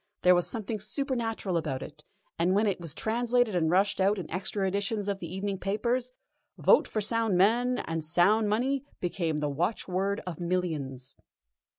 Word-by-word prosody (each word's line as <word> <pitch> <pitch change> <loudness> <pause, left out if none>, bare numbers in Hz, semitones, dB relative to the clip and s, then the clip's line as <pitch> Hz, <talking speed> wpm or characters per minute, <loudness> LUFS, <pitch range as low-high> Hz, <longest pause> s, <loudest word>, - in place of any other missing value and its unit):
There 180 - +7
was 175 -1 +2
something 220 -1 -3
supernatural 225 - -2
about 145 -5 -2
it, 150 0 -11 0.4
and 180 +3 +3
when 210 +2 +3
it 195 -4 -1
was 165 -3 -6
translated 240 0 +1
and 165 -3 +2
rushed 195 +3 +2
out 200 +2 +3
in 180 -5 -5
extra 190 +2 -1
editions 200 +2 -1
of 200 -1 -1
the 170 -3 -7
evening 195 +1 -3
papers: 235 +6 -1 0.5
"Vote - - +5
for 215 - -2
sound 225 -2 +1
men 240 +6 +3
and 165 -1 -3
sound 200 +7 +3
money" 260 +6 0 0.2
became 170 -3 -1
the 150 -1 -1
watchword 190 +5 -1
of 175 -4 -6
millions. 155 -8 -2
195 Hz, 170 wpm, -29 LUFS, 175-220 Hz, 0.5 s, There